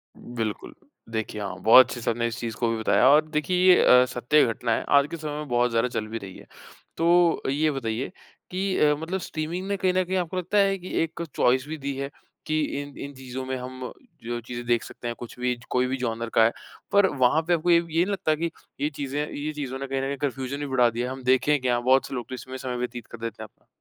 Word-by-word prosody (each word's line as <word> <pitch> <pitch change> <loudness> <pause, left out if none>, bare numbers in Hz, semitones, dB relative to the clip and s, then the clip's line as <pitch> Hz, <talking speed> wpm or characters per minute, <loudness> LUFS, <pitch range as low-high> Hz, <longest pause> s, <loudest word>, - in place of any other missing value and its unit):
बिल्कुल। 115 -3 -5 0.4
देखिए 110 -2 -3
हाँ, 100 - -5
बहुत 125 +4 +8
अच्छे 115 - -2
आपने 115 +1 -1
इस 115 +1 -5
चीज़ 115 -2 -4
को 120 - +1
भी 115 - -1
बताया 110 +3 +3
और 150 +2 +6
देखिए 155 +4 0 0.2
ये - - +4
अ, 125 0 +7
सत्य 125 +4 +2
घटना 115 +1 -2
है। - - +1
आज 140 - +4
के 170 - -4
समय 150 -1 -5
में 150 -1 -5
बहुत 120 0 +2
ज़्यादा 115 +2 +2
चल 110 -3 -3
भी 115 +1 -4
रही 95 -3 -9
है। - - -15 0.5
तो 170 0 +4
ये 150 +3 +2
बताइए 130 +1 -3 0.4
कि 190 +1 -1
अ, 150 -1 +4
मतलब 165 +5 -3
स्ट्रीमिंग 170 +3 -4
ने 200 - -1
कहीं 185 -1 +1
न 185 0 +2
कहीं 185 +1 -1
आपको 180 +1 -2
लगता 185 +3 -1
है 195 -1 +4
कि 180 - -9
एक 165 +1 -5
चॉइस 130 +2 +3
भी 160 - -5
दी 140 -1 -4
है 140 0 -3 0.4
कि 155 0 +1 0.2
इन 145 -1 -10
इन 140 - -9
चीज़ों 130 0 -6
में 130 0 -3
हम 130 0 -7 0.3
जो 120 +1 -3
चीज़ें 120 +1 -7
देख 120 -1 +2
सकते 120 - -8
हैं 120 - -3
कुछ 120 0 -9
भी 125 0 0
च 120 - -17
कोई 125 0 +1
भी 130 +1 -2
जॉनर 115 -2 -3
का 115 - +6
है। 115 - +3 0.4
पर 200 -1 +5
वहाँ 135 +3 +3
पे 175 - +3
आपको 170 +1 0
ये, 170 - +7
ये - - -3
नहीं 165 +2 +1
लगता 155 -5 +1
कि 165 +1 -2 0.3
ये 150 - +1
चीज़ें 145 -1 -4
ये 150 +2 -3
चीज़ों 135 -3 -5
ने 135 - -4
कहीं 135 0 -2
न - - -3
कहीं 140 0 -3
कन्फ्यूज़न 135 0 -3
भी 145 - -3
बढ़ा 125 -3 +3
दिया 120 +2 -3
है 130 - -4
हम 130 -1 -7
देखें 130 +4 +3
क्या? 120 -1 +1
बहुत 130 +2 +3
से - - -8
लोग 120 -2 -5
तो 130 - -4
इसमें 130 +1 -8
समय 130 -1 -4
व्यतीत 120 -2 -5
कर 115 - -10
देते 115 -1 -6
हैं - - -8
अपना। - - -36
130 Hz, 260 wpm, -25 LUFS, 120-155 Hz, 0.5 s, बहुत